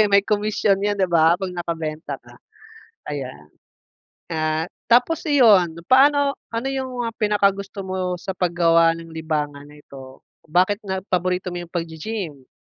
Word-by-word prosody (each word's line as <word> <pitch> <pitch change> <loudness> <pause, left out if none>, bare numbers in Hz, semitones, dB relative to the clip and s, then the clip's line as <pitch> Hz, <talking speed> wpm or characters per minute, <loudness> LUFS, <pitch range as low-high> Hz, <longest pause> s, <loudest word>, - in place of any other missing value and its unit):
Siyempre 215 - +6
may 200 0 +5
komisyon 210 -1 +1
yan 205 +1 0
'di 185 -2 +1
ba 165 0 +5
'pag 190 -1 -4
nakabenta 165 -3 -4
ka, - - -17 0.7
ayan. 130 - -6 0.8
Ah, 155 -1 -1 0.2
tapos 250 +8 +4
iyon, 200 - +5
paano 280 +2 +5 0.2
ano 230 +3 -2
'yung 265 -1 -3 0.2
mga 230 - -4
pinaka-gusto 200 -2 0
mo 190 0 -4 0.2
sa 190 -1 -5
paggawa 170 -2 +3
ng 165 - -10
libangan 150 -3 -3
na 150 +1 -15
ito? 135 -2 -13 0.3
Bakit 185 +6 +2
na 190 -1 -2
paborito 180 0 -1
mo 175 - -4
'yung - - -16
pag-gi-gym? 165 -3 -5
180 Hz, 150 wpm, -22 LUFS, 160-205 Hz, 0.8 s, Siyempre